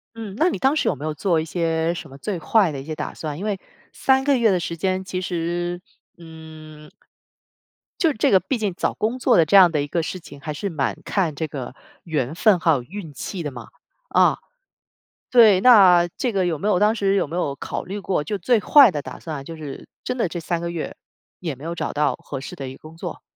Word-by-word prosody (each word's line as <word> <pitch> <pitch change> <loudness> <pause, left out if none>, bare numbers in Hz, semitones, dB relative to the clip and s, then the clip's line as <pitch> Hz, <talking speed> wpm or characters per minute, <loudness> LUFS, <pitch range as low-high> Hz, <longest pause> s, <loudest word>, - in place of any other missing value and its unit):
嗯， 220 -4 -7
那 330 +6 +3
你 - - -3
当 270 +3 +2
时 - - +1
有 - - 0
没 145 +3 -7
有 155 - -2
做 165 +2 +1
一 155 - -3
些 165 0 0
什 175 - -8
么 135 - -12
最 185 +7 -4
坏 195 +3 +3
的 140 -2 -5
一 - - -9
些 155 - -5
打 150 -1 -5
算， 150 -2 -5
因 195 - -5
为 205 -2 -1 0.4
3 265 0 +2
个 280 -2 +3
月 230 -3 +3
的 185 - +2
时 170 0 -4
间 185 +2 -1
其 185 -1 -4
实， 175 0 -3 0.4
嗯。 160 -2 -12 1.1
就 330 -3 +4
这 215 - +1
个 190 - +6
毕 190 +8 -2
竟 210 -4 -2
找 - - -1
工 230 +4 -2
作 - - +3
的 165 - +5
这 165 - +2
样 185 -3 +8
的 155 - 0
一 - - -5
个 170 +4 -1
事 185 +3 -5
情， 145 -4 -13
还 150 0 -5
是 200 +7 -3
蛮 145 -4 -1
看 175 -7 0
这 160 - -2
个 135 -3 -7 0.3
缘 150 -5 -2
分 190 +2 +3
还 165 - +3
有 140 -5 +1
运 165 +3 -9
气 175 +5 -5
的 145 - -4
嘛。 120 -3 -10 0.4
啊， - - +3 0.9
对， 215 -6 +6
那 190 -8 +7
这 245 - 0
个 195 -2 +1
有 170 -3 -1
没 200 - -2
有 205 - +3
当 210 +3 +3
时 200 -3 +1
有 195 - +1
没 155 - -8
有 145 -6 -1
考 - - -5
虑 195 +3 -5
过， 190 -5 -1
就 185 +8 -3
最 220 +5 +2
坏 275 +1 +7
的 150 - -3
打 - - -9
算， 155 -4 -6
就 165 +4 -9
是 150 -3 -9 0.2
真 250 - -3
的 225 - +1
这 175 - -5
3 170 0 -2
个 170 0 -3
月 170 -2 -5 0.5
也 165 -5 -3
没 135 +3 -13
有 170 +1 -3
找 - - -4
到 145 -3 +1
合 135 -2 -7
适 - - -7
的 135 -2 -6
一 130 - -8
个 - - -15
工 160 - -12
作， - - -7
170 Hz, 260 characters per minute, -22 LUFS, 155-200 Hz, 1.1 s, 样